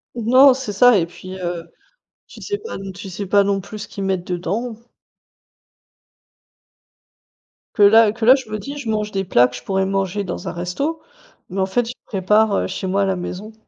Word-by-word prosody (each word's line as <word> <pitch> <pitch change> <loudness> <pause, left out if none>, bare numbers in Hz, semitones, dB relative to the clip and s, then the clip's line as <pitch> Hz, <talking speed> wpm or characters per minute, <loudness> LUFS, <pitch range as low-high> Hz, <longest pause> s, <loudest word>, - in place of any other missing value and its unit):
Non, 255 +4 +6
c'est 255 -5 -5
ça 245 +3 +6
et 170 - +1
puis, 185 +2 -10
heu, 175 -2 -5 0.6
tu - - -13
sais 410 -1 -3
pas 450 +2 -7
non 195 0 -7
tu 195 +1 -9
sais 195 +3 -5
pas 200 +2 +4
non 200 0 0
plus 210 +3 -9
ce - - -7
qu'ils 200 - -6
mettent 190 -2 -1
dedans. 200 +7 -3 3.0
Que 210 - +3
là 220 +1 +7
que 225 +1 -4
là 255 +3 +8
je 260 -5 -7
me 215 - -3
dis: 280 +7 -7
«Je 260 -6 -5
mange 210 -1 -1
des 195 -1 -1
plats 125 -9 +4
que 125 - -11
je 125 - -9
pourrais 190 +7 0
manger 195 +1 -1
dans 180 - -5
un - - -4
resto, 230 - -3 0.5
mais 190 +1 -2
en - - +2
fait 235 +6 0
je 240 - -5
prépare, 210 +2 +2
heu, - - 0
chez - - -5
moi 195 +2 +1
à - - +2
la 190 -1 0
maison». 185 +4 -6
200 Hz, 210 wpm, -20 LUFS, 185-225 Hz, 3.0 s, là